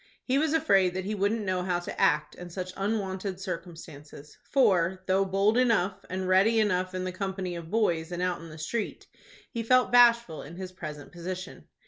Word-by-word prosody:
He 265 +2 +1
was 310 0 +1
afraid 195 - +3
that 185 0 -3
he 210 - -2
wouldn't 205 +2 0
know 185 -1 0
how 180 -1 0
to 175 - -5
act 150 0 +2
in 180 0 -9
such 185 +1 -6
unwonted 195 -2 -2
circumstances, 165 -5 -8
for, 190 -8 +2
though 190 +1 +2
bold 200 +5 +2
enough, 200 -6 +1
and 185 0 -3
ready 195 +5 +4
enough 185 -3 0
in 185 - -2
the 185 - -3
company 190 -1 -4
of 170 -1 -8
boys 175 -6 0
and 175 - -4
out 180 -1 -1
in 165 - -10
the 155 - -10
street, 200 +8 -4 0.5
he 230 - -3
felt 255 +2 +3
bashful 235 -8 +5
in 160 +5 -10
his 185 0 -7
present 150 -5 -8
position. 180 +1 -7
185 Hz, 190 wpm, -28 LUFS, 175-210 Hz, 0.5 s, bashful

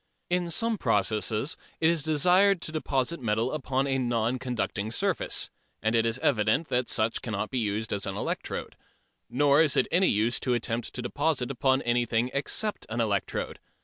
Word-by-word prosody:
In 175 -1 +1
some 225 +5 +2
processes 110 - +1 0.2
it 160 - +3
is 165 -1 +2
desired 180 +6 +4
to - - -2
deposit 150 -1 -1
metal 115 +1 0
upon 135 -3 -1
a 135 -1 0
non 120 0 0
conducting 120 -4 -3
surface, 115 - 0 0.3
and 110 +2 0
it 115 0 +3
is 115 +2 -1
evident 115 +4 +2
that 125 0 0
such 110 0 +1
cannot 105 -4 -3
be 130 - 0
used 105 -1 -2
as 100 -1 -2
an 95 - -3
electrode. - - -4 0.5
Nor 145 +2 +4
is 150 -4 +2
it - - +3
any 185 +2 +4
use 110 +4 +1
to 125 -2 0
attempt 115 0 -3
to 125 - -4
deposit 140 0 -1
upon 130 0 +1
anything 120 0 +1
except 205 +9 -2
an 115 +2 -3
electrode. 105 -4 -1
125 Hz, 175 wpm, -27 LUFS, 110-150 Hz, 0.5 s, desired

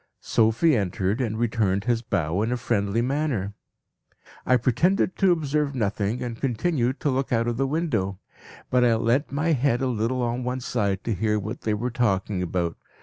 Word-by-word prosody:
"Sophie 115 +8 +3
entered 100 +2 -1
and 110 -3 -2
returned 110 -4 0
his 120 0 +1
bow 90 -4 -1
in 110 +2 0
a 125 - 0
friendly 115 -2 0
manner. 130 -7 -1 0.9
"I 125 - +5
pretended 150 - +1
to 190 -2 +4
observe 150 -3 0
nothing, 105 0 -1
and 120 -2 -6
continued 130 0 0
to 145 - +1
look 130 +1 -1
out 115 -1 +1
of 120 -1 -1
the 135 +1 +1
window. 130 - -1 0.5
But 125 -1 +4
I 120 -2 +4
leant 120 +6 +1
my 155 +4 0
head 135 -4 +2
a 135 - 0
little 125 +1 -1
on 120 +1 -1
one 125 +1 -2
side 100 -6 -1
to 115 - -1
hear 105 +2 0
what 110 +4 -5
they 110 -1 0
were 120 +4 -2
talking 100 -5 0
about. 85 -1 -2
120 Hz, 185 wpm, -25 LUFS, 105-130 Hz, 0.9 s, I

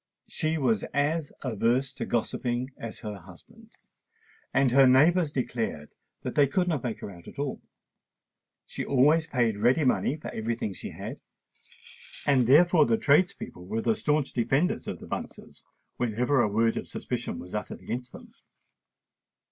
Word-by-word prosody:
She 160 +1 -1
was 120 -8 +1
as 145 +1 0
averse 125 +2 0
to - - -5
gossiping 120 +2 -1
as 115 -2 -8
her 105 -3 -6
husband; 210 - -17 0.8
and 135 -2 +3
her 135 +1 +6
neighbours 155 +5 +4
declared 115 - -3 0.3
that - - -3
they 145 -1 +4
could 180 +6 0
not 155 -8 -1
make 120 -3 -4
her - - -6
out 85 -2 -14
at - - -12
all. 140 -1 -3 1.0
She - - -5
always 150 +5 +3
paid 120 -8 +1
ready 125 +8 +3
money 130 +1 +2
for 155 - -7
every 115 +1 -2
thing 105 -3 -4
she - - -8
had; - - -7 1.1
and 130 -4 +3
therefore 160 +2 +6
the 115 -1 +3
tradespeople 145 - +1
were 110 +3 -2
the 115 - +3
stanch 150 +3 0
defenders 135 +8 0
of - - -4
the - - -11
Bunces - - -7 0.3
whenever 125 +3 +1
a 115 - +3
word 115 +2 +1
of - - -4
suspicion - - -4
was 90 - -9
uttered 105 - -5
against 125 +1 -5
them. - - -13
130 Hz, 160 wpm, -27 LUFS, 115-145 Hz, 1.1 s, her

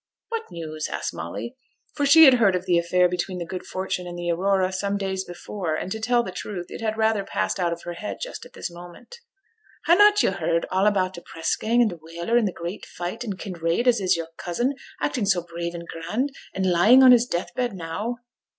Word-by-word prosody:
'What 455 -1 -4
news?' 155 -2 -5
asked - - -4
Molly, 85 - -6 0.4
for 285 -2 0
she 320 +3 +9
had 265 - +8
heard 200 -5 +4
of 180 0 -3
the 175 -2 +3
affair 180 +1 +3
between 180 +1 -3
the 175 - -4
Good 180 +2 -7
Fortune 185 -1 -3
and 175 0 -7
the 175 0 -1
Aurora 190 +1 +1
some 200 +1 -1
days 190 -1 -2
before; 175 -2 -4
and, 180 - -4
to 220 - -3
tell 240 +2 +2
the 185 - -6
truth, 180 0 -6
it - - -7
had 220 -1 -1
rather 220 -2 +2
passed 195 - -2
out 175 -2 +1
of 170 0 -5
her 175 - -5
head 190 +5 -6
just - - -6
at - - -14
this - - -5
moment. 175 - -12 0.7
'Hannot 415 +4 +6
yo' - - +3
heard 170 -3 0
all 190 +2 +3
about 190 -3 +1
t' 170 - -9
press 165 - -2
gang 235 +2 +2
and 220 - +1
t' 175 - -8
whaler, 170 +7 -3
and 235 -3 +4
t' 185 - -3
great 170 +4 -6
fight, 175 +7 -5
and 205 -5 -4
Kinraid, 175 +2 -2
as 235 -4 +4
is 185 -2 +2
your 165 -1 -5
cousin, 240 +10 -1 0.3
acting 250 -8 -1
so 185 -3 +2
brave 170 0 -5
and 170 0 -7
grand, 215 +13 -2 0.2
and 190 - 0
lying 220 +10 +6
on 255 - +9
his 245 0 +5
death 175 -5 -3
bed 245 -5 -2
now?' 185 +8 -4
190 Hz, 230 wpm, -24 LUFS, 175-225 Hz, 0.7 s, she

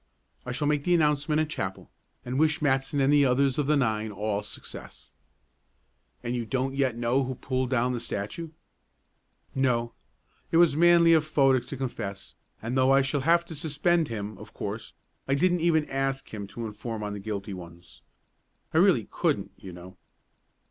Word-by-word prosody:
I - - -2
shall 145 +4 -1
make 150 -1 +1
the 175 +2 +3
announcement 150 -1 +2
at 155 - -2
chapel, 95 -11 -5 0.3
and 125 +2 -2
wish 155 +1 +3
Matson 140 -1 +1
and 135 +1 +3
the 145 -1 +5
others 135 +1 +2
of 145 - 0
the 150 0 +3
nine 110 -4 0
all 105 0 -2
success." - - -11 1.1
"And 120 0 -2
you 120 - -1
don't 130 +3 -2
yet 135 -3 0
know 120 +3 +1
who 130 0 -4
pulled 130 0 -2
down 125 -1 +1
the 120 - -2
statue?" 115 +9 -5 1.0
"No. 120 -3 0 0.6
It 165 - +3
was 170 -4 +5
manly 170 0 +6
of 160 -2 +4
Fodick 135 -5 +2
to 140 - -6
confess, 100 -7 -5 0.3
and 120 +3 -3
though 130 0 +4
I 135 0 +5
shall 135 +1 0
have 170 +4 +3
to 170 - -8
suspend 160 +2 +1
him, 105 -2 -5
of - - -13
course, - - -5 0.3
I 135 - +2
didn't 175 +3 +2
even 160 -2 +3
ask 135 -2 -2
him 100 -2 -5
to 115 +3 -6
inform 110 +1 -5
on 105 0 -4
the 105 - -5
guilty 100 0 -5
ones. 85 -1 -12 0.7
I - - +4
really - - +4
couldn't, - - 0
you 95 - -10
know." 90 +1 -12
135 Hz, 180 wpm, -27 LUFS, 115-150 Hz, 1.1 s, manly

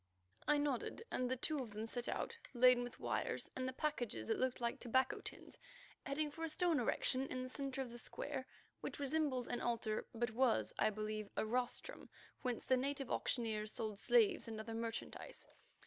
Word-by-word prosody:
I 295 - +5
nodded 290 - 0
and 250 0 +1
the 260 - +2
two 295 +4 0
of 250 -4 -3
them 215 +1 -3
set 240 +1 -2
out - - -1 0.2
laden 250 0 +7
with 245 - -7
wires - - -1
and 255 0 -1
the - - 0
packages 245 - -1
that - - +2
looked 255 -1 +1
like 235 -1 -1
tobacco 260 +2 +2
tins, - - -7 0.5
heading 295 +2 0
for 325 +3 -6
a 325 - 0
stone 335 0 +3
erection 255 +2 +2
in 255 -1 -2
the 255 - -5
centre 270 0 -2
of 245 - -8
the 240 - -8
square 270 +1 -4 0.3
which - - -4
resembled 280 -3 +1
an 240 - -2
altar, 230 -2 0
but 235 0 0
was, 245 +1 +3
I 215 - +5
believe, 215 0 -3
a - - +2
rostrum 245 +2 -1 0.3
whence 250 -3 -1
the 260 0 +5
native 275 0 -1
auctioneers 215 -3 0
sold 215 -3 -2
slaves 415 - +5
and 220 -1 -4
other 220 +1 -4
merchandise. 225 0 -4
250 Hz, 190 wpm, -39 LUFS, 230-275 Hz, 0.5 s, laden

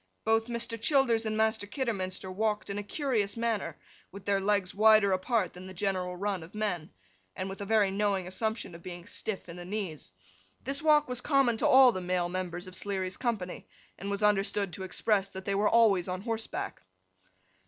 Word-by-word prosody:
Both 225 +1 +2
Mr. 235 -1 -4
Childers 235 -5 +3
and 215 0 -1
Master 220 -1 +1
Kidderminster 195 -6 -3
walked 210 +1 -1
in 200 - -2
a - - -2
curious 215 -3 -1
manner; 230 -3 -1 0.3
with 200 0 -11
their 200 -1 +2
legs 200 -2 +1
wider 215 -1 +6
apart 190 +2 0
than 180 +1 -10
the 190 - -9
general 185 -1 -1
run 200 -1 -2
of 165 +6 -12
men, 200 -7 -2 0.5
and 185 - -3
with 195 +1 -7
a - - -3
very 210 -3 +3
knowing 200 -2 0
assumption 205 +1 -3
of 170 - -11
being 175 -1 -8
stiff 210 -4 -4
in 170 0 -9
the 175 - -7
knees. 180 - -5 0.5
This 275 +2 -2
walk 300 -1 +4
was 250 0 -2
common 275 -5 +3
to - - +2
all 260 -1 +8
the 185 - -4
male 180 -1 0
members 180 -1 -4
of 185 0 -9
Sleary's 190 -2 -2
company, 215 -8 -3 0.3
and 200 - -4
was 200 +1 -2
understood 200 -2 +2
to 190 - -5
express, 195 +1 +1
that 190 0 -8
they 200 - 0
were 205 +2 +3
always 210 -6 +4
on 185 0 -3
horseback. 225 0 -4
200 Hz, 195 wpm, -30 LUFS, 185-225 Hz, 0.5 s, all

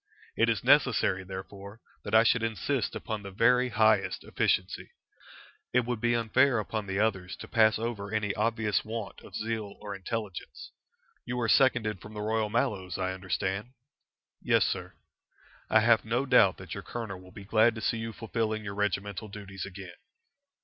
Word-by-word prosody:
It 115 - +3
is 110 - 0
necessary, 125 -8 +3
therefore, 100 +3 -9 0.2
that - - -1
I 110 - +8
should 115 +1 +3
insist 115 +3 -1
upon 110 -2 -4
the 100 - -8
very 125 +5 +3
highest 110 -3 +2
efficiency. 90 0 -1 0.8
It 125 - +5
would 120 -2 -3
be 120 0 +2
unfair 120 +3 +3
upon 105 0 -3
the 95 0 -2
others 100 -4 0
to - - -10
pass 110 -2 +4
over 110 -3 -4
any 105 -2 0
obvious 110 -1 0
want 110 -2 -6
of - - -12
zeal 110 -2 -3
or 105 -1 -6
intelligence. 100 -1 -6 0.5
You 125 0 -3
are 115 - 0
seconded 110 -6 +3
from 105 +1 -11
the 105 - -4
Royal 110 0 0
Mallows, 95 -5 -1
I 95 -1 -1
understand?" 95 +4 -3 0.7
"Yes, - - +3
sir." - - -3 0.8
"I 110 - +5
have 115 0 +4
no 120 +5 0
doubt 100 -7 +5
that - - -8
your - - -5
colonel 110 -6 -6
will 90 0 -15
be 100 +1 -11
glad 110 +2 +4
to 110 - -6
see 115 - 0
you 115 0 -4
fulfilling 110 -1 -2
your 100 -1 -5
regimental 105 +1 -2
duties 100 -2 -7
again." 95 -1 -9
110 Hz, 170 wpm, -29 LUFS, 100-115 Hz, 0.8 s, I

